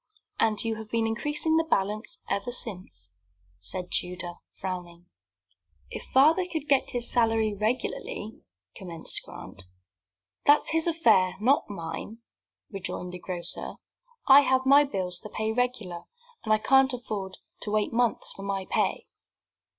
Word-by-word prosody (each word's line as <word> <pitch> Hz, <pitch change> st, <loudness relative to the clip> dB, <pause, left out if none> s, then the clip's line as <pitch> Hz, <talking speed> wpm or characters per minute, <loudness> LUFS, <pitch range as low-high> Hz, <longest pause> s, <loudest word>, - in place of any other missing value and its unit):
"And 215 Hz, -2 st, +2 dB
you 225 Hz, -1 st, -1 dB
have 220 Hz, -1 st, -8 dB
been 230 Hz, 0 st, +1 dB
increasing 295 Hz, +8 st, 0 dB
the 325 Hz, -, +3 dB
balance 210 Hz, -7 st, -1 dB
ever 200 Hz, +4 st, -1 dB
since," 180 Hz, -, -5 dB, 0.5 s
said 175 Hz, -, -4 dB
Tudor, 180 Hz, -1 st, -3 dB, 0.2 s
frowning. 175 Hz, -2 st, -6 dB, 0.9 s
"If -, -, -5 dB
father 315 Hz, +7 st, +4 dB
could 310 Hz, -3 st, -3 dB
get 275 Hz, -2 st, +3 dB
his 240 Hz, -1 st, -1 dB
salary 225 Hz, -3 st, +2 dB
regularly 230 Hz, -, -3 dB, 0.2 s
" 90 Hz, 0 st, -54 dB
commenced 170 Hz, -3 st, -7 dB
Grant. 100 Hz, -, -10 dB, 0.8 s
"That's 290 Hz, +1 st, +5 dB
his 325 Hz, +1 st, +2 dB
affair, 190 Hz, -, +4 dB
not 255 Hz, +4 st, +3 dB
mine," 200 Hz, +3 st, -6 dB, 0.5 s
rejoined 180 Hz, -2 st, -5 dB
the 180 Hz, -, -6 dB
grocer. 175 Hz, -1 st, -5 dB, 0.5 s
"I 275 Hz, +1 st, +10 dB
have 260 Hz, -2 st, +3 dB
to -, -, -11 dB
pay 265 Hz, -, 0 dB
my 285 Hz, +1 st, +8 dB
bills 185 Hz, -5 st, -3 dB, 0.3 s
regular, 225 Hz, -9 st, -2 dB, 0.4 s
and 215 Hz, -, -2 dB
I 215 Hz, -, +6 dB
can't 265 Hz, +4 st, +4 dB
afford 205 Hz, -6 st, -5 dB, 0.2 s
to -, -, -5 dB
wait 215 Hz, 0 st, +1 dB
months 240 Hz, -1 st, +1 dB
for -, -, -10 dB
my 195 Hz, -1 st, -2 dB
pay." -, -, 0 dB
215 Hz, 145 wpm, -27 LUFS, 185-260 Hz, 0.9 s, I